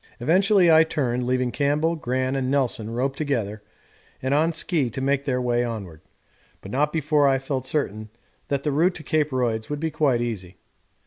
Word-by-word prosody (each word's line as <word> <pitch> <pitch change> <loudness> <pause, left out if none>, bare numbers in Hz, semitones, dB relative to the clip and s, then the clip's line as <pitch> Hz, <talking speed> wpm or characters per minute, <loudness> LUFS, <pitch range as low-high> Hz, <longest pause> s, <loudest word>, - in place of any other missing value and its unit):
Eventually 185 - +4
I 160 0 +7
turned, 125 -6 -1
leaving 125 -1 0
Campbell, 145 +5 +1
Gran, 130 -2 -1
and 130 -1 -1
Nelson 130 -5 0
roped 130 +4 -2
together 115 -9 -2 0.6
and 130 +1 -1
on 160 +3 +3
ski 160 -5 0
to 115 - -6
make 140 +1 0
their 130 -3 0
way 120 -1 +1
onward, 100 -10 -6 0.6
but 95 - -10
not 150 +4 +1
before 150 -2 +2
I 135 -1 +3
felt 135 -1 -4
certain 110 -8 -2 0.4
that 140 -1 -1
the 150 - 0
route 170 +6 +2
to 160 - -7
Cape 155 -1 +1
Royds 115 -4 -1
would 150 0 -3
be 160 +1 -2
quite 135 -7 +1
easy. 100 -7 -5
135 Hz, 185 wpm, -24 LUFS, 120-150 Hz, 0.6 s, I